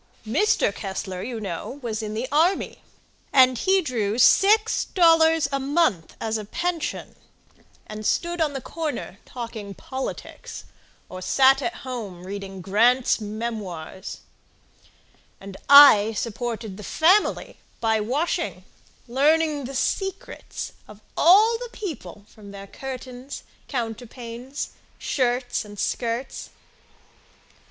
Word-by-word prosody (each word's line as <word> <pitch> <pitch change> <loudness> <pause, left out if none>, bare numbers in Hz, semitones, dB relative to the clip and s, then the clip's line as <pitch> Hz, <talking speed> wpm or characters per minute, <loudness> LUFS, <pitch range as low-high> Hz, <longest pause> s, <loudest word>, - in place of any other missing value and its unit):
Kessler 215 - -6
Mr. 420 - +2
Kessler, 190 -2 -5
you 235 +2 -5
know, 195 +6 -5
was 225 -2 -3
in 215 0 -5
the 235 +4 -2
army, 330 +6 +1 0.5
And 255 -1 +6
he 380 0 +3
drew 225 -7 -1
six 425 - +4
dollars 325 -3 +4
a 275 - 0
month 270 - 0
as 220 0 -2
a 210 - -7
pension, 345 - -3 0.7
And 215 0 -8
stood 345 +9 0
on 300 -2 +1
the 270 - -4
corner 315 +2 -5
talking 225 -5 -7
politics, 260 +7 -7 0.4
Or 185 0 -8
sat 270 +6 +4
at 235 -3 -2
home 210 -9 -6
reading 195 -1 -7
Grant's 235 +6 +3
Memoirs; 210 -6 -6 1.2
And 195 0 -10
I 275 -7 +9
supported 225 -2 -4
the 210 - -9
family 360 - +2 0.2
by 220 -1 +1
washing, 265 +11 -2 0.4
Learning 295 +3 +2
the 270 +2 -7
secrets 385 - -3 0.2
of 210 -1 -13 0.2
all 430 +7 +5
the - - -6
people 225 - -7
From 210 -2 -14
their 200 0 -9
curtains, 255 +3 -8 0.2
counterpanes, 240 +2 -5 0.3
shirts 245 -1 -1
and 205 -1 -12
skirts. 235 +5 -3
245 Hz, 115 wpm, -24 LUFS, 210-300 Hz, 1.2 s, I